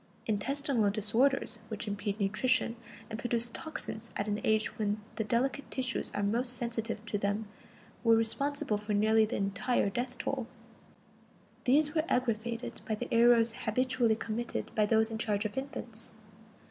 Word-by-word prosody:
Intestinal 240 +1 +1
disorders 230 +5 +1
which 220 0 -5
impede 205 +1 -2
nutrition, 230 +4 +2 0.3
and 220 0 -6
produce 235 +1 +2
toxins 235 -5 -4
at 205 - -2
an 210 0 0
age 220 0 +1
when 210 0 0 0.2
the 220 - +1
delicate 250 +6 0
tissues 255 -2 -2
are 205 - 0
most 240 +5 +1
sensitive 230 -2 -2
to 210 -1 -1
them, 205 +2 -1 0.6
were 230 -1 +6
responsible 225 0 0
for 210 0 -3
nearly 220 +1 +4
the 215 - -3
entire 200 +2 0
death 245 +4 -3
roll. 260 -4 -1 1.2
These 295 +4 +4
were 315 -2 +2
aggravated 235 -1 -1
by 220 - 0
the 240 +3 -5
errors 230 -1 +5
habitually 245 0 +1
committed 225 +2 -3
by 210 -1 +2
those 220 +1 +3
in 220 - -4
charge 210 -2 0
of 215 - -3
infants. 240 -5 -6
225 Hz, 150 wpm, -31 LUFS, 215-245 Hz, 1.2 s, were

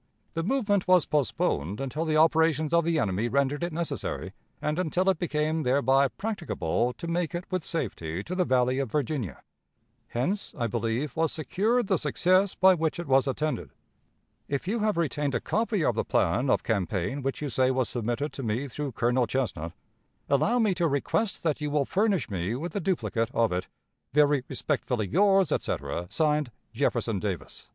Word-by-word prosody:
The 165 - -1
movement 205 -2 +1
was 185 -3 +5
postponed 105 - 0
until 135 +4 -2
the 155 -1 +1
operations 160 -1 +3
of 170 0 +4
the 165 -1 +1
enemy 105 -1 0
rendered 140 +3 +1
it 175 - -1
necessary, 165 +1 -3 0.3
and 150 +3 -1
until 185 +2 0
it 185 - -4
became 155 -1 0
thereby 135 0 +3
practicable 135 - -2
to 170 - -7
make 170 -1 -1
it 175 +1 -4
with 185 -3 -1
safety 95 - -3
to 175 - -5
the 185 0 +2
Valley 130 -3 +2
of 135 -5 -2
Virginia. 130 - -2 0.6
Hence, 180 - -2
I 120 - 0
believe, 115 +5 -2
was 160 0 +1
secured 210 - 0
the 190 -4 +1
success 180 - +2
by 190 0 +6
which 160 -3 -1
it 175 - -4
was 135 -1 +3
attended. 150 +3 -2 0.7
"If 140 +5 -3
you 225 +4 0
have 215 -3 +1
retained 145 -4 0
a - - +2
copy 215 -6 0
of - - +3
the - - -1
plan 120 +11 +1
of - - +2
campaign 105 +4 -1
which 135 0 -2
you 150 - -3
say 130 +1 +2
was 130 -2 +1
submitted 120 +5 -2
to - - -6
me 120 +4 -2
through 140 0 -5
Colonel 120 +2 +1
Chesnut, 100 -12 -2 0.6
allow 205 - +2
me 220 -5 +3
to 175 -1 +1
request 160 +9 -1
that 155 -3 0
you 150 - -1
will 145 -1 +1
furnish 200 +1 +1
me 95 +3 -2
with 165 +9 -5
a - - +1
duplicate 115 - -1
of 115 -3 +3
it." 90 +1 -2 0.5
"Very 145 -2 +4
respectfully 125 -6 -1
yours, 195 - +3
etc.," 90 +1 -2
(Signed) 150 -3 +1 0.2
"Jefferson 115 -4 0
Davis." 95 -5 -5
145 Hz, 180 wpm, -27 LUFS, 120-170 Hz, 0.7 s, by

